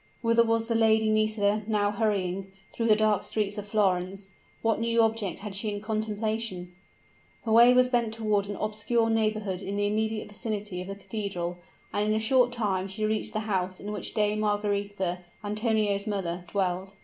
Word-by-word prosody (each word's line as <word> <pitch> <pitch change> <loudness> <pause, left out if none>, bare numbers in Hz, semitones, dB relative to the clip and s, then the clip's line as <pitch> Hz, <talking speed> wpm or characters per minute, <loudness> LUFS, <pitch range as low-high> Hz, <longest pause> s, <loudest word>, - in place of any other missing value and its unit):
Whither 230 0 +4
was 225 0 +1
the 230 - -1
Lady 220 -1 +3
Nisida 215 -1 +2
now 205 -2 +1
hurrying, 195 -3 -1 0.2
through 230 - -1
the 215 - +6
dark 215 -2 +2
streets 210 -1 -2
of 205 - -7
Florence? 195 -2 0 0.3
what 225 -1 +2
new 230 0 +1
object 225 -4 +1
had 210 -1 -6
she 205 +3 -1
in 205 0 -3
contemplation? 215 -3 -2 0.7
Her 225 - -1
way 235 +2 +8
was 250 0 +5
bent 240 -3 +1
toward 215 -3 0
an 205 - -4
obscure 220 +2 0
neighborhood 215 -4 0
in 200 0 -4
the 205 0 +1
immediate 215 +1 -1
vicinity 210 -3 -4
of 185 - -7
the 195 - -5
cathedral; 195 -4 -4 0.3
and 210 +1 +1
in 215 - +2
a - - +1
short 245 +2 +3
time 200 -6 -1
she 195 +3 -3
reached 215 0 -1
the 215 - -1
house 190 -4 -2
in 205 - -6
which 210 - -4
Dame 210 0 +1
Margaretha, 205 -3 -1 0.2
Antonio's 210 -1 0
mother, 180 -4 -3
dwelt. 190 +1 -2
210 Hz, 180 wpm, -28 LUFS, 200-220 Hz, 0.7 s, way